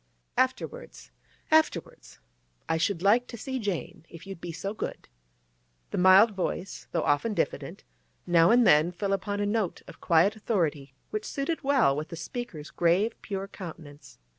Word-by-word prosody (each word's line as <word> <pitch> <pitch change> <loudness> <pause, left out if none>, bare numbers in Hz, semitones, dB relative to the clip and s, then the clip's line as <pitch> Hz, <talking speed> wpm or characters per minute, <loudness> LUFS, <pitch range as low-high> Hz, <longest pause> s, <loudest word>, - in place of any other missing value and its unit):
'Afterwards—afterwards. 310 - -2 0.5
I 160 - +1
should 175 +1 -1
like 230 +5 +4
to 235 - -8
see 260 +3 -4
Jane, 200 -7 -4
if 165 +2 -12
you'll 195 0 -7
be 170 0 -6
so 190 +5 -4
good.' - - -6 0.8
The - - -1
mild 190 +5 +7
voice, 190 -1 -4
though 165 - 0
often 175 +10 +1
diffident, - - -3 0.4
now 170 -1 +5
and 240 0 +5
then 155 +1 +5
fell 195 +3 -2
upon 205 +1 -2
a 205 - 0
note 205 -3 -1
of - - -13
quiet 175 +5 +3
authority 155 - -2 0.2
which 215 0 -3
suited 285 +7 -3
well 270 - +3
with 155 +2 -4
the - - -6
speaker's 165 -3 -7
grave, 180 +7 +2
pure 195 -2 -4
countenance. 160 -7 -11
195 Hz, 155 wpm, -28 LUFS, 165-225 Hz, 0.8 s, mild